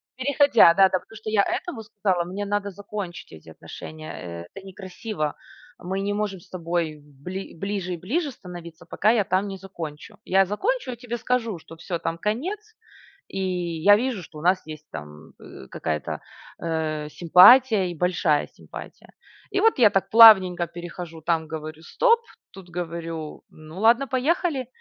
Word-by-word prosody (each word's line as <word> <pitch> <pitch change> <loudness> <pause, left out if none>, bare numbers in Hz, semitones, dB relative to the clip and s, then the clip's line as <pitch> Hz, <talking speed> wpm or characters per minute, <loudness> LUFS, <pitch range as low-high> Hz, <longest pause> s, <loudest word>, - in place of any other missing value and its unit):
Переходя, 260 - +5
да, 195 0 +5
да. 185 - 0
Потому 225 - -18
что 220 0 -6
я 205 -2 +3
этому 270 -11 -3
сказала: 200 -5 -1
"Мне 195 +3 -5
надо 205 0 -1
закончить 200 -2 -7
эти 80 0 -13
отношения. 90 - -9
Это 195 - -11
некрасиво. 190 -3 -5 0.4
Мы 190 +2 -3
не 200 +1 -1
можем 205 -2 -2
с - - -20
тобой 170 -3 -3
бли 150 +8 -8
ближе 195 0 -3
и - - -4
ближе 280 - -2
становиться, 175 -5 -11
пока 210 - +1
я 220 -4 +2
там 190 +2 0
не 195 -1 -6
закончу. 165 -6 -9
Я 195 +1 +4
закончу 325 - -1
и 240 - -7
тебе 240 0 -5
скажу, 230 -4 -1
что 165 - -13
всё, 170 +1 -4
там 165 0 -2
конец. 370 - -3 0.5
И 195 - -5 0.4
я 205 +3 +7
вижу, 235 -3 -2
что 155 -2 -12
у 150 - -9
нас 185 +1 +3
есть 155 -1 -9
там, 75 0 -10
э, 65 - -12
какая-то, 75 -2 -3 0.4
э, 155 -2 -2
симпатия, 190 - +6
и - - -6
большая 170 -3 +1
симпатия". - - -12 0.4
И 395 -2 0
вот 450 -5 +3
я 225 -4 +6
так 195 -1 0
плавненько 190 -6 +8
перехожу, 170 -1 -8
там 160 0 0
говорю: 155 0 -7
"Стоп", 465 - +3 0.3
тут 185 -2 -13
говорю: 165 -2 -5
"Ну 155 +4 -11
ладно, 235 +5 +4
поехали". 275 +1 0
185 Hz, 165 wpm, -24 LUFS, 165-220 Hz, 0.5 s, плавненько